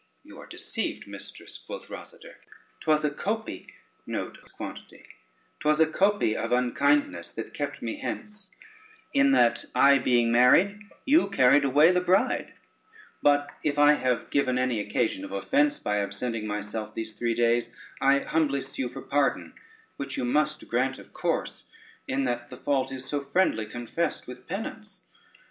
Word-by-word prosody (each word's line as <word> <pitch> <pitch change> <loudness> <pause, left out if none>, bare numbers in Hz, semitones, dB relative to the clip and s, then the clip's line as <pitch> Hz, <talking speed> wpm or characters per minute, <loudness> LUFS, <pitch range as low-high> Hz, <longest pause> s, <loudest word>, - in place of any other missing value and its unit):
"You - - -14
are - - -11
deceived, - - -4
mistress," - - -9
quoth - - -9
Rosader; - - -11 0.4
"'twas 155 -1 +2
a 150 - +1
copy 215 +8 -4 2.0
of 155 - +2
unkindness 285 - +1
that - - -7
kept - - -4
me - - -3
hence, 210 -3 -6 0.6
in 280 0 +4
that, 120 - +3
I 140 +2 +6
being 120 -2 +2
married, 140 - +5 0.3
you 290 -4 +4
carried 140 -5 +5
away 145 +5 +5
the 180 0 +2
bride; 185 +2 +1 0.7
but 145 0 +3
if 145 -1 -1
I 145 0 +7
have 125 -5 -1
given 130 -3 +2
any 125 -3 0
occasion 195 - -1
of 290 - -7
offence 290 +1 +1
by 105 0 -1
absenting 110 +2 -3
myself 105 +1 -4
these 110 -1 -4
three 115 +2 -1
days, 120 0 +2 0.3
I 140 +1 +4
humbly 145 -4 0
sue 135 -2 -4
for 135 +2 -9
pardon, 145 0 0 0.4
which 140 - -5
you - - -1
must 150 +4 0
grant 130 +2 0
of - - -15
course, - - -2 0.4
in 135 +1 0
that 120 -1 -2
the - - -9
fault 135 -2 0
is 130 -1 -5
so 145 +2 -1
friendly 140 - +1
confessed 120 +9 -3
with 125 0 -11
penance. 200 0 -6
140 Hz, 145 wpm, -27 LUFS, 120-175 Hz, 2.0 s, I